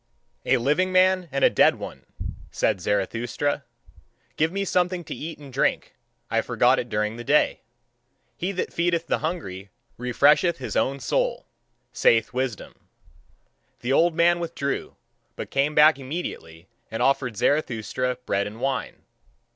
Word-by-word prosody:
"A - - +4
living 150 +10 +1
man 185 -1 +3
and 135 0 -1
a - - +7
dead - - +5
one," - - -9 0.4
said 100 -4 0
Zarathustra. 115 - -1 0.7
"Give 160 +1 +1
me 195 +1 -2
something 180 -1 0
to - - -6
eat 160 +1 -6
and 140 -3 -13
drink, - - 0 0.4
I - - +2
forgot 125 +2 +3
it 120 - -4
during 105 +1 -1
the 120 - -6
day. 145 +5 +2 0.8
He 180 +3 -2
that 185 - -3
feedeth 170 -1 0
the - - 0
hungry 100 - -4 0.3
refresheth 145 +7 +3
his 130 - -6
own 135 +1 +1
soul, 120 - -1 0.5
saith 115 +2 +3
wisdom." 125 -4 -4 0.9
The 125 +2 0
old 165 +2 +3
man 170 +1 +4
withdrew, 165 -5 -3 0.4
but - - -7
came 140 +2 +1
back 150 -1 +6
immediately 130 - -6 0.2
and 115 - -2
offered 135 -5 +1
Zarathustra 125 -2 0
bread 100 +1 0
and 105 +2 -9
wine. 130 -3 -3
140 Hz, 145 wpm, -24 LUFS, 120-170 Hz, 0.9 s, a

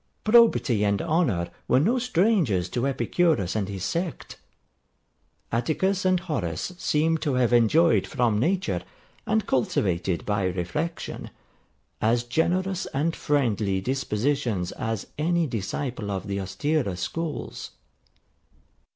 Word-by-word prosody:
Probity 215 - +4
and 100 -1 +2
honour 150 - 0 0.2
were 125 - +4
no 230 - +2
strangers 180 - +2
to 125 +7 -1
Epicurus 140 - +1
and 100 -3 -1
his 95 -2 -4
sect. 170 - -4 1.1
Atticus 185 +11 0
and 185 -1 +3
Horace 120 - -3
seem 160 +1 +1
to 145 -5 -1
have 125 -1 +2
enjoyed 150 +9 +4
from 120 -6 +1
nature, 185 - 0 0.5
and 220 0 +1
cultivated 90 -8 0
by 105 -2 0
reflection, 95 - -3 0.7
as 115 +2 +2
generous 180 +8 0
and 160 +4 -1
friendly 110 -9 0
dispositions 120 -3 -1
as 110 -3 -3
any 170 +2 +2
disciple 115 -1 -3
of 95 -2 -3
the 100 -1 -3
austerer 100 - -1
schools. 160 - -4
130 Hz, 115 wpm, -25 LUFS, 100-165 Hz, 1.1 s, Probity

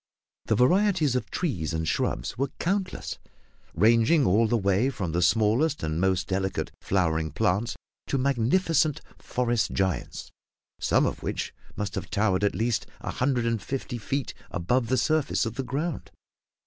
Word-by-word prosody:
The - - +2
varieties 165 - +3
of 110 -5 -2
trees 90 - -2
and 80 0 -2
shrubs - - -1
were 135 +3 -1
countless, 190 +1 -2 0.6
ranging 115 - +4
all 110 +4 +4
the 120 - +2
way 100 +5 +2
from 95 -10 -3
the 85 +2 0
smallest 115 - +2
and 80 +2 -1
most 95 -1 +2
delicate 95 0 -2
flowering 80 -4 +1
plants 95 +10 0 0.3
to 140 - 0
magnificent 140 +4 +2 0.2
forest 120 -2 0
giants, 95 -2 -2 0.5
some - - +3
of - - -2
which - - -3 0.2
must 105 -1 -3
have 90 -4 -5
towered 100 -2 +1
at 100 - +2
least 115 0 0
a - - -3
hundred 125 -2 0
and 115 -2 0
fifty 130 0 -4
feet 135 +4 -3 0.2
above 115 +7 0
the 130 - +1
surface 155 -4 +1
of 115 - -3
the 135 - -3
ground. 140 +6 -3
115 Hz, 155 wpm, -27 LUFS, 95-135 Hz, 0.6 s, ranging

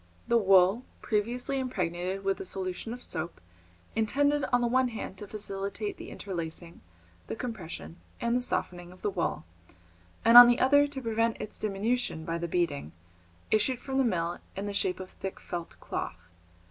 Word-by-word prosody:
The 235 - +3
wool, 195 +1 +5 0.2
previously 240 +5 0
impregnated 185 -6 -2
with 195 0 0
a - - -4
solution 185 +3 -4
of 245 +1 -7
soap, 165 +2 -4 0.6
intended 285 +6 +2
on 245 0 +4
the - - +2
one 255 +2 +3
hand 225 -5 -6
to 205 - -7
facilitate 200 0 -4
the - - -8
interlacing, 170 -2 -6 0.5
the - - -3
compression, 195 -8 -6 0.2
and 235 -1 +1
the 250 - +2
softening 175 -7 -2
of 185 - -17
the 205 - +1
wool, 165 - -2 0.8
and 230 +1 +12
on 245 - +12
the 240 0 +3
other 285 +2 +5
to 280 -2 -6
prevent 230 0 +1
its - - -5
diminution 215 -4 -1
by 165 0 -2
the 170 - -2
beating, 150 - -1 0.6
issued 245 +4 +3
from 265 +2 -2
the - - +5
mill 175 -6 0 0.2
in 195 - -3
the 205 - -3
shape 185 -2 0
of 185 0 -8
thick 190 - -6
felt 175 -1 -6
cloth. 85 +1 -5
205 Hz, 170 wpm, -29 LUFS, 180-240 Hz, 0.8 s, and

